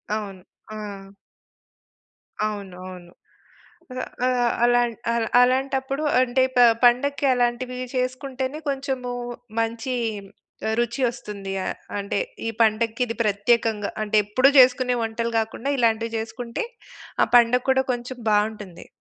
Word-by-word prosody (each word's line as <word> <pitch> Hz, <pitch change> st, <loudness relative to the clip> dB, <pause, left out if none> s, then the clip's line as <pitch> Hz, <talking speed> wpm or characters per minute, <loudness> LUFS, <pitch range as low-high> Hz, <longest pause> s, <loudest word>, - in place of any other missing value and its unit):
అవును. 195 Hz, -3 st, -6 dB, 0.3 s
ఆ! 200 Hz, -2 st, -7 dB, 1.4 s
అవును. 200 Hz, -3 st, -5 dB
అవును. 175 Hz, -1 st, -11 dB, 0.8 s
ఆహ్, 255 Hz, -, -3 dB, 0.2 s
ఆహ్, 245 Hz, -2 st, +2 dB
అలాన్ 240 Hz, -1 st, +3 dB, 0.2 s
అలాన్ 230 Hz, -1 st, 0 dB
అలాంటప్పుడు 265 Hz, +3 st, +1 dB, 0.2 s
అంటే 255 Hz, +1 st, +2 dB
ప 245 Hz, -, +4 dB, 0.2 s
పండక్కి 275 Hz, +4 st, +3 dB
అలాంటివి 245 Hz, +1 st, -1 dB, 0.2 s
చేసుకుంటేనే 260 Hz, +2 st, -3 dB
కొంచెము 265 Hz, -2 st, -3 dB, 0.5 s
మంచి 230 Hz, +3 st, -2 dB, 0.7 s
ఆహ్, 220 Hz, -, 0 dB
రుచి 240 Hz, +2 st, -1 dB
ఒస్తుంది. 200 Hz, -5 st, -7 dB
ఆహ్, -, -, -3 dB, 0.2 s
అంటే 200 Hz, 0 st, -2 dB, 0.3 s
ఈ -, -, 0 dB
పండక్కి 225 Hz, +2 st, +2 dB
ఇది 230 Hz, -, -5 dB
ప్రత్యేకంగా 210 Hz, 0 st, +1 dB
అంటే 215 Hz, 0 st, +1 dB
ఎప్పుడూ 255 Hz, +7 st, +4 dB
జేసుకునే 250 Hz, 0 st, +5 dB
వంటలు 230 Hz, +1 st, -2 dB
గాకుండా 225 Hz, +5 st, -3 dB
ఇలాంటివి 230 Hz, 0 st, +1 dB
జేసుకుంటే 235 Hz, -, -4 dB, 0.6 s
ఆ -, -, +1 dB
పండగ 240 Hz, +1 st, +4 dB
కూడా 265 Hz, 0 st, +3 dB
కొంచెం 245 Hz, +1 st, -6 dB
బావుంటుంది. 210 Hz, -4 st, -1 dB
235 Hz, 115 wpm, -23 LUFS, 215-255 Hz, 1.4 s, జేసుకునే